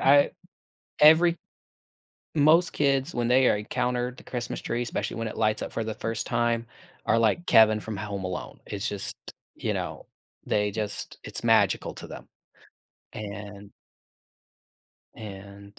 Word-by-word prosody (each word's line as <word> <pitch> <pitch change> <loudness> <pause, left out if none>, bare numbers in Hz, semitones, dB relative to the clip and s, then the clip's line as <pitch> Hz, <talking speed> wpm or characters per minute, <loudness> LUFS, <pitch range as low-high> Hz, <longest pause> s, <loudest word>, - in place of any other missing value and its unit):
I 140 +1 +5 0.7
every 165 +3 +7 1.0
most 160 +4 +5
kids, 140 +2 +1
when 120 -1 0
they 130 +2 +5
encounter 125 +3 0
the - - -13
Christmas 120 -3 -4
tree, 120 +1 -2
especially 120 - -3
when 115 0 -3
it - - -8
lights 110 -1 +1
up - - -5
for 115 - -2
the 110 0 -3
1st 115 0 -3
time, 115 0 0 0.4
are 110 - +4
like 115 +10 +2
Kevin 110 -1 +6
from 110 0 -5
Home 100 -1 -4
Alone, 90 -1 -5
it's 105 +3 -3
just 100 -1 -4 0.4
you - - -2
know, - - -5 0.4
they 105 0 +1
just 105 0 -5
it's - - -6
magical - - +3
to - - -9
them, - - -10 0.9
and 100 -1 -8 1.4
and, 100 -1 -10
115 Hz, 140 wpm, -27 LUFS, 105-125 Hz, 1.4 s, every